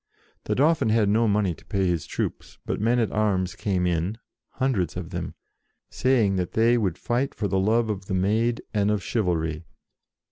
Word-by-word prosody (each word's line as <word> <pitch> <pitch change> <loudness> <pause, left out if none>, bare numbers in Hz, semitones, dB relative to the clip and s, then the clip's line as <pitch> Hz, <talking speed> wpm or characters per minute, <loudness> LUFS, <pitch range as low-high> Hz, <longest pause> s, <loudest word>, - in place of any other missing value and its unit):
The - - 0
Dauphin 150 -3 +3
had 110 -2 +3
no 115 +2 +3
money 100 -3 +1
to 80 - -16
pay 95 +2 -1
his 85 -4 -1
troops, - - -4
but - - -2
men 115 +3 +2
at 115 -3 +1
arms 95 -4 0
came 95 -1 -1
in, 90 +5 -1 0.4
hundreds 125 - -1
of - - -6
them, - - -5 0.6
saying 115 -7 +2
that 90 -2 -2
they 115 +2 +4
would 100 -8 0
fight 125 +3 -1
for 105 - -1
the 95 -1 0
love 110 +4 +2
of 100 -3 -4
the 95 - -1
Maid 110 +5 +1
and 105 -1 +2
of 105 -2 0
chivalry. 85 -7 -1
105 Hz, 185 wpm, -25 LUFS, 95-115 Hz, 0.6 s, they